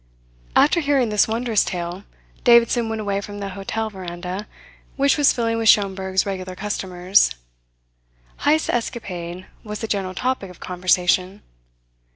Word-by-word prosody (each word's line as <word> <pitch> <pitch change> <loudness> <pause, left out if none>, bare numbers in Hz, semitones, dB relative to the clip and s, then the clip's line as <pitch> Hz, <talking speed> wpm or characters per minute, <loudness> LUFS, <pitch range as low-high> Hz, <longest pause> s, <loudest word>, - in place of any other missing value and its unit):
After 305 +4 +5
hearing 280 -6 +2
this 210 -1 +3
wondrous 225 -1 +1
tale, 175 +2 -5 0.4
Davidson 235 -1 +4
went 225 0 -3
away 200 -1 -1
from 205 0 -8
the 200 -1 -4
hotel 200 +3 -3
veranda, 185 +1 -6 0.5
which 280 0 +3
was 290 -2 +5
filling 230 -1 -1
with 225 -1 +3
Schomberg's 190 -2 +3
regular 185 -2 -5
customers. 185 - +1 1.0
Heyst's 310 +2 +2
escapade 185 -7 -4 0.2
was 210 -1 -5
the 225 - -3
general 190 -3 -2
topic 250 -3 -2
of 180 - -14
conversation. 180 +2 +1
200 Hz, 135 wpm, -22 LUFS, 185-230 Hz, 1.0 s, After